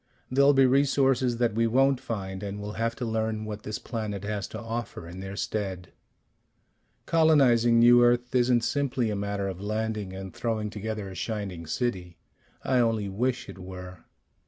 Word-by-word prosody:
There'll 140 +2 +5
be 135 0 +6
resources 135 -2 +3
that 120 -2 +1
we 115 +1 +2
won't 135 +3 +3
find, 95 -7 -5
and 100 0 -5
we'll 105 0 -5
have 115 +2 -2
to 120 - -4
learn 110 -1 -2
what 105 -1 -6
this 105 - -4
planet 105 -4 -5
has 100 -1 -3
to - - -7
offer 115 -6 -5
in 90 +2 -9
their 95 +1 -6
stead. 95 -4 -3 1.2
Colonizing 135 -8 +4
New 120 +1 +7
Earth 120 +1 +2
isn't 125 -1 +3
simply 125 -3 0
a - - -2
matter 100 0 -2
of 95 -1 -5
landing 105 -1 -2
and 95 -1 -7
throwing 110 -1 -2
together 105 -1 -4
a - - -8
shining 95 -5 -4
city. 90 -4 -3 0.5
I 130 -1 +2
only 110 -4 +1
wish 125 +6 -1
it - - -10
were. 90 -1 -9
110 Hz, 170 wpm, -27 LUFS, 100-120 Hz, 1.2 s, New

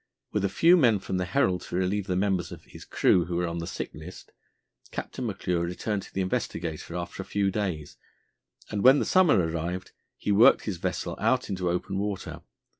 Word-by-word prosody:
With 105 - -1
a 100 - +2
few 170 - +5
men 120 -9 +4
from 95 -1 -3
the 90 - -1
Herald 90 0 +1
to - - -7
relieve 95 +2 0
the 90 - 0
members 95 -2 0
of - - -10
his - - -13
crew 90 -2 +3
who 85 - -4
were 90 0 0
on 85 0 -3
the 85 - -5
sick - - -5
list, 80 +4 -11 0.6
Captain - - -5
McClure 90 -1 -1
returned 95 +4 -2
to - - -13
the 95 - -2
Investigator 85 -3 -3
after 85 +2 -5
a - - -5
few 100 -1 0
days, 90 -8 -3 0.7
and 105 - -1
when 130 +3 +8
the - - 0
summer 185 - +4
arrived 85 +1 -2 0.3
he 105 - -2
worked 115 +7 +6
his 100 -5 -3
vessel - - -3
out - - +1
into 90 -2 -1
open 90 +2 -2
water. 100 -1 -4
95 Hz, 200 wpm, -27 LUFS, 85-100 Hz, 0.7 s, when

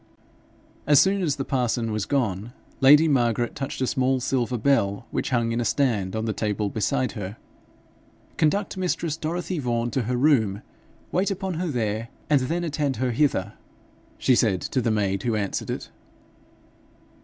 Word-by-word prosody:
As 145 -2 +7
soon 195 +1 +3
as 155 -6 +1
the 135 - -4
parson 120 -4 0
was 105 -2 -2
gone, 115 -5 -1 0.3
lady 150 +4 +7
Margaret 120 -4 +1
touched 135 -1 -5
a - - +3
small 130 +1 +1
silver 125 -1 -1
bell 105 -5 +1
which - - -2
hung 120 -3 +1
in 115 +1 0
a - - 0
stand 115 -8 0
on 110 0 -2
the 110 - -1
table 105 -1 -1
beside 130 +4 0
her. 100 -1 -6 1.0
'Conduct 195 +6 0
mistress 175 -4 -1
Dorothy 170 +2 -3
Vaughan 120 -2 -1
to 130 - 0
her 125 - 0
room, 115 -8 +2 0.5
wait 190 +3 +1
upon 190 -1 -3
her 180 - -1
there, 115 -5 -2 0.2
and 145 -3 +5
then 170 +7 -1
attend 145 -4 -1
her 125 +1 -1
hither,' 115 -6 +1 0.6
she 130 - +3
said 110 -6 +2
to 130 - -1
the 115 - 0
maid 100 -3 0
who 120 -3 0
answered 100 -2 -2
it. - - -5
125 Hz, 165 wpm, -25 LUFS, 110-145 Hz, 1.0 s, As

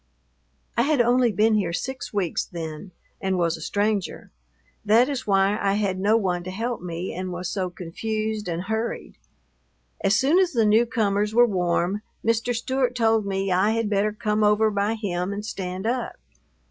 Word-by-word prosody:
I - - +3
had 285 +2 +2
only 240 0 +4
been 215 +2 +3
here 195 -5 +1
six 265 +8 -4
weeks 195 -5 -1
then, 165 +2 -7 0.3
and 190 -1 0
was 170 -2 +1
a 160 - -11
stranger. 205 +2 -2 0.5
That 225 +4 +4
is 265 -4 -4
why 195 +1 +3
I 195 -1 +2
had 200 -2 -1
no 210 +4 +3
one 180 -5 -1
to - - -5
help 230 +6 -3
me 175 +1 -5
and 185 +1 -4
was 180 0 -4
so 185 -2 -2
confused 215 +5 -4
and 170 0 -3
hurried. 220 - -4 0.8
As 195 +2 +3
soon 280 - +3
as 370 -3 +2
the 230 -3 +3
newcomers 210 -1 +2
were 240 0 +7
warm, 180 -1 0 0.2
Mr. 230 +2 +1
Stewart 255 +1 -1
told 225 -3 +2
me 195 0 -1
I 190 +4 +3
had 225 -2 -1
better 205 +1 +2
come 215 0 -1
over 210 +1 +3
by 205 +2 0
him 185 -4 -2
and 205 +1 -5
stand 185 -2 -5
up. 245 +1 -1
210 Hz, 175 wpm, -24 LUFS, 185-225 Hz, 0.8 s, were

